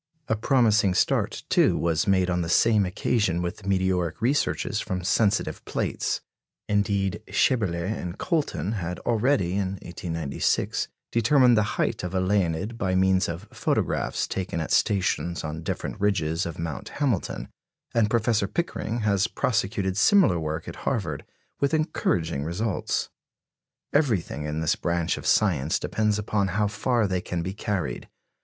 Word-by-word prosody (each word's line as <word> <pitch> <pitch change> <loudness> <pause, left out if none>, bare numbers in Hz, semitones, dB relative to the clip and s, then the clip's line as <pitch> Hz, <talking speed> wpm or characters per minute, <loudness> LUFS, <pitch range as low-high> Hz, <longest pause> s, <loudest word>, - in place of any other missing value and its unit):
A 110 - +1
promising 110 -5 +3
start, - - +1
too, - - +3
was 85 -2 0
made 95 -2 +3
on 90 0 0
the 85 - -3
same 105 +1 +4
occasion 95 -1 0
with 90 +3 -4
meteoric 95 -3 0
researches 135 +5 0
from 90 -1 -3
sensitive 105 +2 +1
plates. - - -2 0.5
Indeed, 100 -1 0
Schaeberle 105 -10 +2
and 95 -3 -4
Colton 155 - -1
had 90 -5 -3
already, 115 -5 +1
in 95 0 -1
1896, 85 -4 -1 0.2
determined 125 +2 +5
the 105 -1 0
height - - 0
of 90 +1 -4
a - - +2
Leonid 95 +3 0
by 95 -1 0
means 95 -1 +3
of 85 +1 -6
photographs - - 0
taken 95 -3 -3
at 80 - -3
stations 95 -3 +1
on 80 +1 -4
different 85 - -4
ridges 85 -4 +1
of 85 - -6
Mount 80 -3 -5
Hamilton; 130 -11 -1 0.4
and 110 -3 +3
Professor 110 -3 +2
Pickering 120 - -2
has 100 -1 +2
prosecuted 100 -6 -1
similar 110 - +5
work 80 +1 -4
at 85 - -7
Harvard, 85 - -2 0.3
with 140 +3 +2
encouraging 85 - 0
results. 95 +6 -2 0.8
Everything 105 - +1
in 75 +1 -2
this 80 - +2
branch 85 -1 -1
of - - -6
science 80 -8 +2
depends 105 -1 0
upon 105 -1 0
how 105 +3 0
far 115 +2 +1
they 90 -2 -1
can 85 -2 -3
be 95 +2 -3
carried. 95 - -3
95 Hz, 145 wpm, -26 LUFS, 85-110 Hz, 0.8 s, determined